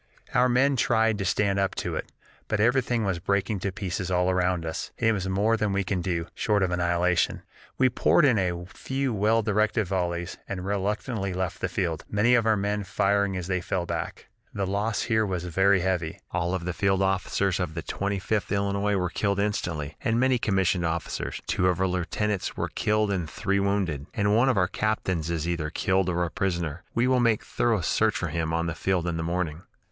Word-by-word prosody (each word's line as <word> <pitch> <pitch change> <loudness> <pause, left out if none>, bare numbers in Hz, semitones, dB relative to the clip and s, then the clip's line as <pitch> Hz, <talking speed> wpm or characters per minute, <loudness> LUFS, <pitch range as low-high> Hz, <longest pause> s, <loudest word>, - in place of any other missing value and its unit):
"Our 125 +1 +4
men 135 +3 +3
tried 110 -2 +2
to 100 - -1
stand 100 +1 +1
up 95 -1 0
to - - -3
it, - - -5 0.4
but 110 - -1
everything 120 0 +2
was 95 -3 -1
breaking 100 +3 0
to 100 - -2
pieces 95 -2 -3
all 90 0 +2
around 90 -2 +1
us, 80 - -4
and 115 - +1
it - - +3
was 95 -2 -2
more 105 +4 +2
than 105 -3 0
we 100 0 +1
could 90 0 -1
do, 85 -2 -1
short 105 -3 +1
of 90 - 0
annihilation. 90 0 +1 0.3
We 130 - +5
poured 135 +5 +3
in 125 -7 +4
a 90 -2 -1
few 135 +7 -3
well 110 +2 +2
directed 105 +1 +1
volleys, 85 -1 -2
and 95 -2 -4
reluctantly 100 0 -2
left 95 -1 -2
the - - 0
field 85 -4 -2
many 105 +4 +3
of 115 -2 +3
our 110 -1 +4
men 100 +1 -1
firing 100 0 +1
as 90 - -4
they 90 0 -1
fell 90 0 -2
back. - - -5 0.3
The 100 - 0
loss 100 +3 -1
here 110 -1 +2
was 90 -4 -2
very 95 +2 +3
heavy. 90 -3 -1
All 90 +1 0
the 90 0 -4
field 95 +2 +1
officers 95 0 0
of 85 -3 -3
the 85 - -4
Twenty 100 +2 -2
fifth 105 +2 -1
Illinois 100 0 +1
were 90 -2 -1
killed 100 0 0
instantly, 85 -8 -2
and 115 +1 +1
many 130 -1 +3
commissioned 95 -5 +1
officers; 85 0 -3
two 90 - +1
of 90 -1 +1
our 95 - +2
lieutenants 95 +2 -1
were - - -1
killed 105 -1 +1
and 90 -5 -2
three 100 +4 0
wounded, 95 -7 -1
and 105 -2 +2
one 125 +4 +4
of 125 - +2
our 90 -2 +3
captains 95 -6 -1
is 85 -1 -2
either 85 -3 -1
killed 95 +3 +1
or 90 0 0
a 85 - -3
prisoner. 85 -2 -2
We 115 - +3
will 130 0 +3
make 115 -3 +2
thorough 115 -5 0
search 110 +6 +2
for 90 - -2
him 80 0 -2
on 85 +1 0
the 85 - -2
field 90 +2 0
in 85 -2 -1
the 80 - -2
morning. 85 -2 -2
95 Hz, 210 wpm, -26 LUFS, 90-105 Hz, 0.4 s, We